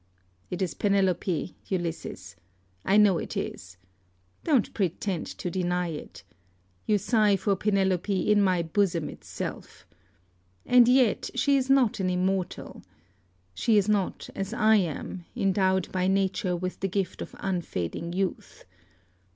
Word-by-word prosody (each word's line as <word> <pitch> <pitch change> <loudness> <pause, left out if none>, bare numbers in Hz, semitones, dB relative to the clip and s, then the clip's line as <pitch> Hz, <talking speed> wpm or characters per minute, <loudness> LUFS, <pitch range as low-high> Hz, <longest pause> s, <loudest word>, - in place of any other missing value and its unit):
It 180 +2 -2
is 180 - -2
Penelope, 190 -3 0
Ulysses, 165 - -4 0.5
I 200 - +3
know 200 -5 +5
it - - -5
is. 90 0 -5 0.7
Don't 280 -9 +2
pretend 190 -1 -2
to 180 - -4
deny 180 -1 -1
it. 155 -2 -8 0.6
You 210 - +4
sigh 210 0 +3
for 195 +1 0
Penelope 190 -1 +1
in 210 -1 +5
my 185 -3 +2
bosom 170 -1 0
itself. - - -7 0.8
And 245 -1 +6
yet 250 -3 +3
she 285 -1 +3
is 265 -1 0
not 265 -7 +3
an 185 -1 0
immortal. 185 0 -2 0.7
She 215 - +2
is 200 -1 +3
not, 205 -3 0
as 195 +4 -4
I 220 -1 +5
am, 175 0 -3
endowed 190 -4 +1
by 185 0 0
Nature 190 0 +1
with 185 +1 -4
the 195 - -1
gift 195 0 -2
of - - -7
unfading 170 - -3
youth. 190 0 -3
190 Hz, 135 wpm, -27 LUFS, 180-205 Hz, 0.8 s, And